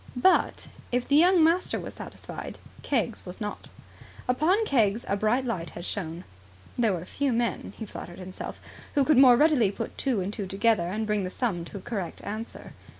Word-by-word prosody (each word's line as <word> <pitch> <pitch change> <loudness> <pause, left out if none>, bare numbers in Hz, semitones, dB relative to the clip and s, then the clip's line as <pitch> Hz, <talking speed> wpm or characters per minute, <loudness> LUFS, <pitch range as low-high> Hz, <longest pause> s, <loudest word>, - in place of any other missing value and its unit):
But, 370 +10 +3 0.2
if 245 0 0
the 285 - +3
young 350 +2 +6
master 335 +3 +2
was - - -7
satisfied, - - -8 0.2
Keggs 235 -4 -1
was 180 -1 -7
not. 210 -1 -5 0.6
Upon 335 - +3
Keggs 225 - +2
a 200 - +1
bright 220 +6 +1
light 185 -9 -3
had 170 - -8
shone. 170 -3 -4 0.5
There 230 -4 +2
were 175 -1 -4
few 275 +7 -1
men, 235 0 -1
he 220 - -5
flattered 175 -3 -9
himself, 185 0 -7 0.4
who 285 - +5
could 305 -2 +4
more 250 -3 +8
readily 290 -8 +4
put - - -5
two 260 -6 +1
and 190 +2 -3
two 200 -3 -4
together 195 -2 +2
and 215 +5 -2
bring 210 -2 0
the 185 - -2
sum 185 -6 -2
to 200 - -8
a - - -8
correct 195 -5 -5
answer. 220 +3 -6
225 Hz, 190 wpm, -27 LUFS, 195-260 Hz, 0.6 s, more